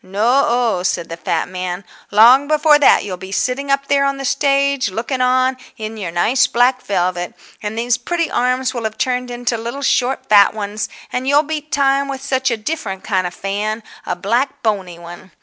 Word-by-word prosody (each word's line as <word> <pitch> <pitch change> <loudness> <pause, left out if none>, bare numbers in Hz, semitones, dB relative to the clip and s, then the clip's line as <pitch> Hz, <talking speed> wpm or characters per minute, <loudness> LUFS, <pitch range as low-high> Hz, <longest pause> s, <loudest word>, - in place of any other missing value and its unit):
No 225 +8 +2
o," 235 -5 +1
said 180 -2 -2
the 165 - -5
fat - - -2
man, 180 0 -5 0.3
"long 240 +7 +6
before 305 0 +4
that 290 - +5
you'll 185 -3 -5
be 190 +1 -10
sitting 255 +7 -1
up 275 0 +1
there 280 0 +2
on 275 0 0
the 275 - -5
stage, 275 -2 +1
looking 235 +6 -3
on, 255 +1 +2 0.2
in 220 -1 -6
your 200 -5 -5
nice 235 +12 +2
black 250 +1 +2
velvet. 180 -2 -2 0.3
And 215 +1 -5
these 235 +1 0
pretty 335 +6 -2
arms 255 +1 0
will 235 -3 -4
have 220 0 -4
turned 250 -1 -1
into 240 -1 -2
little 235 +5 -5
short 265 -1 0
fat 205 0 +5
ones, 210 0 -4 0.2
and 255 +1 -2
you'll 290 +2 +4
beat 305 -1 -5
time 275 0 +2
with 270 -1 -6
such 265 -1 0
a 235 - -1
different 210 -6 -4
kind 185 -4 0
of 175 - -9
fan—a 210 -1 -4
black 235 +9 -1
bony 195 -6 -2
one." 175 +1 -12
240 Hz, 195 wpm, -18 LUFS, 200-275 Hz, 0.3 s, long